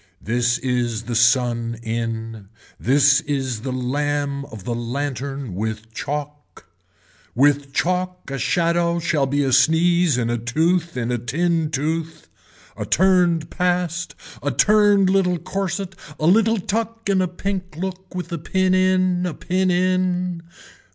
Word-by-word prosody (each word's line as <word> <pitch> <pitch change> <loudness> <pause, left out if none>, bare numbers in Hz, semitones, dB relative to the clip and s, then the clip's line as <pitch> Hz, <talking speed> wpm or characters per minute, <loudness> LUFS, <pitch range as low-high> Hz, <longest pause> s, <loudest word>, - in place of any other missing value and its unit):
This 120 +2 +1
is 120 -3 -1
the 120 - -5
sun 115 0 +2
in. 115 -2 -4 0.3
This 140 +2 +4
is 135 -6 -2
the 130 +2 -4
lamb 140 +2 -2
of 110 -8 -10
the 120 - -3
lantern 135 0 -4
with 110 +3 -4
chalk. 145 -3 -6 0.7
With 140 +2 +3
chalk 180 0 -2
a 135 - -3
shadow 170 +4 +1
shall 160 -5 0
be 145 +2 +1
a 135 -2 0
sneeze 165 +1 +4
in 120 -1 0
a 120 - -1
tooth 160 +7 0
in 120 0 -1
a 120 - -1
tin 160 +7 0
tooth, 160 +2 -3 0.5
a - - -4
turned 175 -3 +2
past, 180 -1 -1 0.3
a 145 - -1
turned 205 - +4
little 185 -2 +2
corset, 190 +2 -3 0.3
a 155 - -1
little 225 +6 +4
tuck 225 +3 -3
in 195 -2 +2
a 185 - +1
pink 185 -1 -4
look 190 +1 -5
and - - -13
with 180 -1 -5
a 170 - -3
pin 185 +3 +1
in, 185 -1 +2
a 170 - -4
pin 185 +1 0
in. 180 -1 0
155 Hz, 145 wpm, -21 LUFS, 125-180 Hz, 0.7 s, This